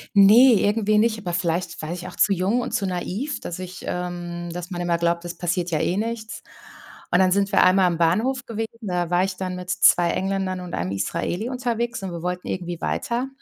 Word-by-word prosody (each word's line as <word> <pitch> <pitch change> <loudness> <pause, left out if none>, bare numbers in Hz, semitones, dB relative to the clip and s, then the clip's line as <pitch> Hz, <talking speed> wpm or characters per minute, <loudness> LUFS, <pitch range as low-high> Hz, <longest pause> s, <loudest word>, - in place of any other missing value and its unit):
ne, 225 +6 +8
irgendwie 210 0 +2
nicht, 220 0 +2
aber 180 -4 -4
vielleicht 170 0 -2
war 155 +2 -4
ich 180 0 -6
auch - - -11
zu 210 -1 +3
jung 195 +7 +1
und - - -4
zu 195 - 0
naiv, 190 +10 -3
dass 175 +1 -6
ich, 185 0 -8
ähm 175 -1 -4
dass 175 +1 -6
man 175 -1 -4
immer 170 -1 0
glaubt, 170 0 0
das 175 0 -6
passiert 175 0 -1
ja 155 - 0
eh 180 - 0
nichts. 225 +1 -4 0.7
Und 180 - +3
dann 185 -1 +4
sind 200 +1 +1
wir - - +5
einmal 185 0 +5
am 170 -2 0
Bahnhof 225 +11 +1
gewesen, 225 -1 -3
da 180 -3 -2
war 180 +1 +3
ich 190 -1 -3
dann 185 -1 -4
mit 180 0 -7
2 175 0 +4
Engländern 190 -1 -1
und 180 -1 -7
einem 90 +2 -2
Israeli 175 - -2
unterwegs 240 -3 -2
und 190 - -4
wir 170 -1 -6
wollten 180 0 -3
irgendwie 175 -2 -4
weiter. 255 0 -2
185 Hz, 220 wpm, -23 LUFS, 175-215 Hz, 0.7 s, ne